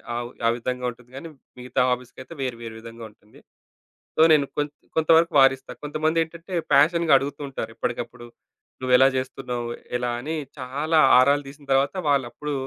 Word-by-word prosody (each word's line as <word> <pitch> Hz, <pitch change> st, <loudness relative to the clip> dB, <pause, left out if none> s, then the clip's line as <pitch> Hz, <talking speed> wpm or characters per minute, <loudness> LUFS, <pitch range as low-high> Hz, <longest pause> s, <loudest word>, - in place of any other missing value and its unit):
ఆవ్ 120 Hz, 0 st, -4 dB, 0.2 s
ఆ -, -, +5 dB
విధంగా 125 Hz, +1 st, -4 dB
ఉంటుంది 125 Hz, 0 st, -13 dB
గానీ, 150 Hz, +5 st, -8 dB, 0.3 s
మిగతా 125 Hz, 0 st, -1 dB
హాబీస్‌కైతే 125 Hz, +3 st, -5 dB
వేరు, 125 Hz, -3 st, -3 dB
వేరు 115 Hz, -1 st, -8 dB
విధంగా 115 Hz, 0 st, -11 dB
ఉంటుంది. 105 Hz, 0 st, -22 dB, 0.8 s
సో, -, -, +4 dB
నేను 150 Hz, -2 st, +5 dB
కొం 145 Hz, 0 st, +1 dB, 0.3 s
కొంత 160 Hz, 0 st, 0 dB
వరకు 165 Hz, +1 st, +2 dB
వారిస్తా. 135 Hz, 0 st, +3 dB
కొంతమంది 155 Hz, +2 st, 0 dB
ఏంటంటే, 165 Hz, +3 st, -11 dB, 0.2 s
పాషన్‌గా 160 Hz, +3 st, +4 dB
అడుగుతూ 140 Hz, +2 st, -5 dB
ఉంటారు, 135 Hz, -, -5 dB
ఎప్పటికప్పుడు 120 Hz, -1 st, -5 dB, 0.6 s
నువ్వు 130 Hz, -1 st, 0 dB
ఎలా 135 Hz, +1 st, +6 dB
చేస్తున్నావు, 125 Hz, -2 st, -4 dB, 0.3 s
ఎలా 125 Hz, 0 st, -2 dB
అని, 155 Hz, +6 st, -4 dB, 0.2 s
చాలా 145 Hz, +5 st, 0 dB, 0.2 s
ఆరాలు 140 Hz, +3 st, +3 dB
తీసిన 145 Hz, +1 st, -15 dB
తరువాత 135 Hz, +5 st, +2 dB
వాళ్లప్పుడు 140 Hz, +2 st, -1 dB
135 Hz, 155 wpm, -24 LUFS, 125-150 Hz, 0.8 s, ఎలా